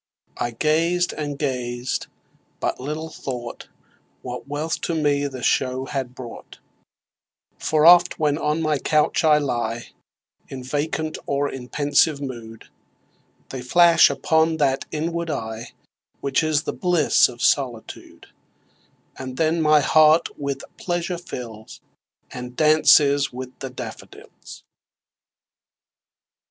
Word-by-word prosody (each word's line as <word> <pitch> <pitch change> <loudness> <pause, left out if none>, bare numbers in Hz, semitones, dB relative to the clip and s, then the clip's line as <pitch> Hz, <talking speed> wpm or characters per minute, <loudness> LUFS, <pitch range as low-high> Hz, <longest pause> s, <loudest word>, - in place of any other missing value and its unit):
I 120 - -1
gazed 165 +8 +1
and 145 -2 -4
gazed 125 -3 -3 0.5
but - - -2
little 155 +4 -5
thought 120 -5 -7 0.6
What 125 +1 -7
wealth 150 +3 -3
the - - -2 0.6
show 130 -1 +2
to - - -3
me 135 - -6
had 130 -3 -4
brought; 120 -3 -10 1.0
For 155 0 +1
oft, 175 +1 +7
when 150 -2 +1
on 150 +1 -1
my 155 -2 +1
couch 155 +4 +1
I 155 -2 +5
lie 120 -5 -2 0.6
In 130 -1 -8
vacant 155 +3 -3
or 140 +1 0
in 125 -2 -8
pensive 145 +1 +2
mood, 115 -5 -8 0.8
They 130 - -6
flash 170 +7 +5
upon 160 +4 +1
that 135 -3 +1
inward 170 +2 -3
eye 110 -5 -4 0.5
Which 135 -1 0
is 155 -1 +1
the - - -3
bliss 175 -5 +3
of 120 -1 -8
solitude; 125 -5 -1 0.9
And 130 -1 -7
then 160 +1 +1
my 155 -1 +5
heart 155 +2 +4
with 140 -1 -4
pleasure 175 0 -3
fills, 115 -9 -9 0.5
And 125 -1 -8
dances 150 -2 +4
with 125 0 -7
the 135 - -5
daffodils. 125 -3 -11
145 Hz, 120 wpm, -22 LUFS, 125-155 Hz, 1.0 s, oft